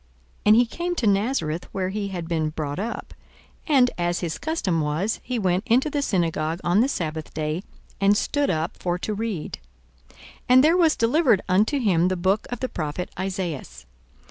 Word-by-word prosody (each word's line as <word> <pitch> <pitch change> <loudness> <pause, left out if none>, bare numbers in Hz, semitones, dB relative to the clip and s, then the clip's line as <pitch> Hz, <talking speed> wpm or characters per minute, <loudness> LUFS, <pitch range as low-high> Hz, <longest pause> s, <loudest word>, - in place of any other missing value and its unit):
42:004:016 - - -33
And 210 - +8
he 240 +2 +5
came 345 +8 -3
to 255 - -1
Nazareth, 195 - 0
where 185 -1 -2
he 200 +1 -3
had 175 -4 -5
been 160 -2 0
brought 155 0 -4
up: 230 +4 -5 0.5
and, 265 -5 +4
as 175 0 0
his 165 -3 -3
custom 205 - -1
was, 155 +8 -1
he 250 0 -3
went 185 -3 +1
into 255 +6 +3
the 290 - 0
synagogue 165 - 0
on 175 +3 +3
the 245 - +4
sabbath 160 - -4
day, 155 +2 -2 0.4
and 200 +1 +4
stood 290 +4 0
up 160 0 -1
for 175 -1 -1
to 210 +4 -3
read. 210 -6 -4 0.5
42:004:017 - - -23 0.3
And 255 +1 +7
there 325 +4 +5
was 330 -3 +4
delivered 235 - +3
unto 210 +9 +2
him 185 -9 +2
the 185 0 -1
book 190 +4 +1
of 245 - -5
the 255 - -1
prophet 155 +2 -4
Esaias. 180 - -4
190 Hz, 190 wpm, -24 LUFS, 170-240 Hz, 0.5 s, And